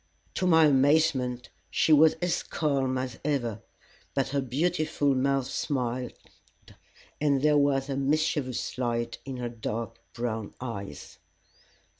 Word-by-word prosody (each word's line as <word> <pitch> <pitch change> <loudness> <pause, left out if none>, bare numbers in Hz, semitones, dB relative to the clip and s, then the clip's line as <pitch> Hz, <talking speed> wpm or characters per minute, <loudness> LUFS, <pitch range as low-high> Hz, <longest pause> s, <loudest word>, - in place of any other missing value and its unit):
To 185 - 0
my 160 -2 +6
amazement 135 -4 +2 0.2
she 160 - +3
was 155 +1 +6
as 175 -1 +1
calm 135 -4 -1
as 130 -2 -4
ever, 120 -8 -1 0.5
but 135 -1 +1
her 140 0 0
beautiful 150 +1 0
mouth 135 0 +1
smiled, 125 -2 -2 1.1
and 140 -2 +2
there 150 -1 +4
was 135 -1 +2
a 140 - -2
mischievous 140 -3 -1
light 120 -1 -2
in 135 -2 -5
her 120 -1 -3
dark 115 0 -5 0.2
brown 115 -3 -3
eyes. 100 - -7
135 Hz, 125 wpm, -28 LUFS, 120-145 Hz, 1.1 s, my